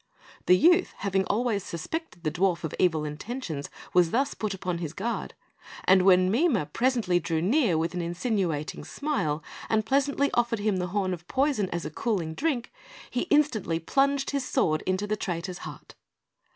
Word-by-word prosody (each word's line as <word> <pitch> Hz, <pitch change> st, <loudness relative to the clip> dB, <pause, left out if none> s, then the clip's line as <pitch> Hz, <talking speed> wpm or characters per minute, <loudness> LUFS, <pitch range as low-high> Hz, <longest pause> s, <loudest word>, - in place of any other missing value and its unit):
The 180 Hz, -, +7 dB
youth, 350 Hz, -, +4 dB
having 195 Hz, -1 st, 0 dB
always 215 Hz, -1 st, 0 dB
suspected 180 Hz, -, -5 dB
the 155 Hz, -, 0 dB
dwarf 175 Hz, 0 st, +1 dB
of 160 Hz, -, -3 dB
evil 160 Hz, -4 st, +2 dB
intentions, 155 Hz, -, -5 dB, 0.2 s
was 180 Hz, -2 st, +5 dB
thus 270 Hz, +9 st, +1 dB
put 215 Hz, -2 st, -3 dB
upon 180 Hz, -2 st, -3 dB
his 165 Hz, -3 st, -4 dB
guard; 230 Hz, +6 st, -3 dB, 0.5 s
and 190 Hz, 0 st, +5 dB
when 185 Hz, 0 st, +5 dB
Mime 235 Hz, -, +2 dB
presently 230 Hz, -8 st, +2 dB
drew 165 Hz, -1 st, -1 dB
near 205 Hz, -, +2 dB
with 165 Hz, +2 st, -1 dB
insinuating 175 Hz, -, -2 dB
smile, 160 Hz, -, -2 dB, 0.3 s
and 220 Hz, -1 st, +2 dB
pleasantly 280 Hz, +3 st, +1 dB
offered 235 Hz, -1 st, +1 dB
him 205 Hz, -2 st, 0 dB
the 180 Hz, 0 st, -1 dB
horn 190 Hz, 0 st, -1 dB
of 175 Hz, 0 st, -8 dB
poison 260 Hz, -, +1 dB
as 170 Hz, -2 st, -3 dB
a 150 Hz, -, -4 dB
"cooling 175 Hz, -4 st, -1 dB
drink," 270 Hz, -, -2 dB, 0.4 s
he 250 Hz, +8 st, -1 dB
instantly 260 Hz, -, +2 dB
plunged 275 Hz, -, +1 dB
his 280 Hz, -2 st, -1 dB
sword 165 Hz, -, +1 dB
into 185 Hz, +2 st, 0 dB
the 210 Hz, +1 st, -1 dB
traitor's 180 Hz, -2 st, -4 dB
heart. -, -, -10 dB
195 Hz, 165 wpm, -27 LUFS, 170-250 Hz, 0.5 s, The